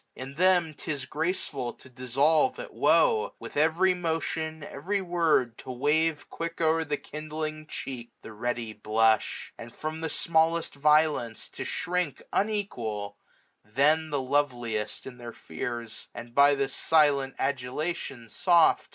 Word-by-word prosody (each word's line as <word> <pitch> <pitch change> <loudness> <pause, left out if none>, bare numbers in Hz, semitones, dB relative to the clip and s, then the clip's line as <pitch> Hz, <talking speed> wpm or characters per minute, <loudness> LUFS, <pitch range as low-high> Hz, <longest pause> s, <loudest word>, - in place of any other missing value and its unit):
In 130 +1 -7
them 175 0 +3
'tis 145 -3 -4
graceful 150 -5 -2
to - - -15
dissolve 135 - +2
at - - -8
woe; 470 0 +3
With - - -10
every 165 +5 +3
motion, 160 -2 -2
every 190 +9 -2
word, 165 -10 +1
to - - -10
wave 150 +4 +1
580 - - -17
Quick 165 0 -5
o'er 160 0 +3
the 150 -2 -2
kindling 155 +1 -6
cheek 125 -5 -6
the 110 - -9
ready 115 0 -3
blush; 110 +1 +1
And 115 +1 -9
from 155 +1 -4
the 160 - -2
smallest 165 +1 +2
violence 150 -5 +2
to - - -6
shrink 180 -4 -2
Unequal, 120 - -2 0.5
then 150 +9 +2
the 145 -2 0
loveliest 125 -6 -1
in 130 -2 -9
their 120 -1 -8
fears; 115 +8 -6
And 120 0 -9
by 140 +2 +6
this 140 0 -1
silent 145 -4 +3
adulation, 135 -1 -3
soft. 170 - +3
150 Hz, 140 wpm, -28 LUFS, 125-165 Hz, 0.5 s, by